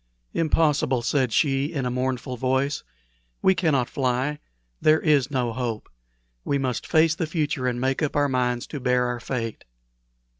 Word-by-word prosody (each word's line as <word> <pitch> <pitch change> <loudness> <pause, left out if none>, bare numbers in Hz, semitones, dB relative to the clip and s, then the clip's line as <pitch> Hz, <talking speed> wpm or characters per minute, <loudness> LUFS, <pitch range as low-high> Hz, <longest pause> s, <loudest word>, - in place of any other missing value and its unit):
"Impossible!" 150 -6 +2
said 130 0 +1
she, 135 +1 +2
in 145 -4 -3
a 125 - -1
mournful 125 0 -2
voice. 130 +3 0 0.6
"We 190 - +6
cannot 145 -9 +1
fly. 135 +1 -1 0.4
There 155 +1 +5
is 145 -5 +2
no 125 -5 -1
hope. 115 -3 -3 0.6
We 140 - 0
must 130 -3 -2
face 160 0 +4
the 165 -1 -2
future, 150 -5 -1
and 120 -1 -1
make 130 +3 0
up 150 - -1
our 145 0 +3
minds 125 -2 0
to 145 - -3
bear 125 -1 +2
our 125 0 -2
fate." 115 -2 -4
130 Hz, 160 wpm, -24 LUFS, 125-150 Hz, 0.6 s, We